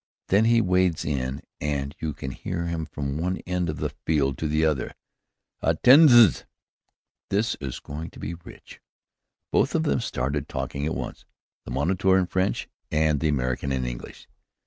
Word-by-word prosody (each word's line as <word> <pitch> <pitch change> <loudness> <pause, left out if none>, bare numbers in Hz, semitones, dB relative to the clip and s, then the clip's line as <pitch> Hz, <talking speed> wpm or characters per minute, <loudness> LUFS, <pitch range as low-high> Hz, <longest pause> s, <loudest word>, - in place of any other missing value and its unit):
Then 100 +4 +4
he 115 0 +4
wades 90 -4 +1
in 65 -2 -2 0.2
and 70 -1 -2
you 75 -3 -3
can 65 - -5
hear 85 +6 -4
him 85 -2 -3
from 70 0 -4
one 90 +3 -1
end 90 -2 -1
of 75 - -3
the - - -2
field 70 -4 0
to 80 - -1
the 75 +1 +2
other. 75 -5 -1 0.7
Attendez! 120 - +6 0.9
this 105 +4 +1
is 65 -3 -5
going 75 +3 -7
to - - -14
be 80 - -4
rich!" 85 0 -13 0.7
Both - - +2
of - - +2
them 70 - +1
started 70 +3 -2
talking 70 +1 -3
at 80 - -2
once, - - -6 0.4
the - - -8
moniteur 95 +6 +2
in 95 - +2
French 95 +2 -1 0.2
and 75 -1 +2
the 80 - +1
American 65 -1 -1
in 65 -1 -1
English. - - -7
80 Hz, 170 wpm, -25 LUFS, 70-90 Hz, 0.9 s, Attendez